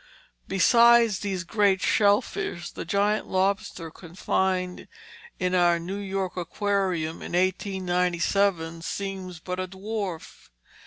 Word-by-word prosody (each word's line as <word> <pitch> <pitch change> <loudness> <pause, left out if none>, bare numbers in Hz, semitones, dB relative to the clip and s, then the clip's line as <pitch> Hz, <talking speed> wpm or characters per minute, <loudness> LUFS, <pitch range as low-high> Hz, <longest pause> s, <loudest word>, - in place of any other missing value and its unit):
Beside 235 +4 +5
these 195 -2 -3
great 200 +1 +2
shell 205 +1 +3
fish 410 - -5
the - - -7
giant 205 +4 +1
lobster 190 -3 -1
confined 180 +1 -2 0.5
in 180 0 -1
our 175 -1 +4
New 185 +4 -5
York 195 -2 -3
Aquarium 180 -2 -1
in - - -7
1897 180 -2 0
seems 190 -1 -5
but 180 +3 -5
a 185 - -2
dwarf. 195 -2 -6
190 Hz, 110 wpm, -26 LUFS, 175-200 Hz, 0.5 s, Beside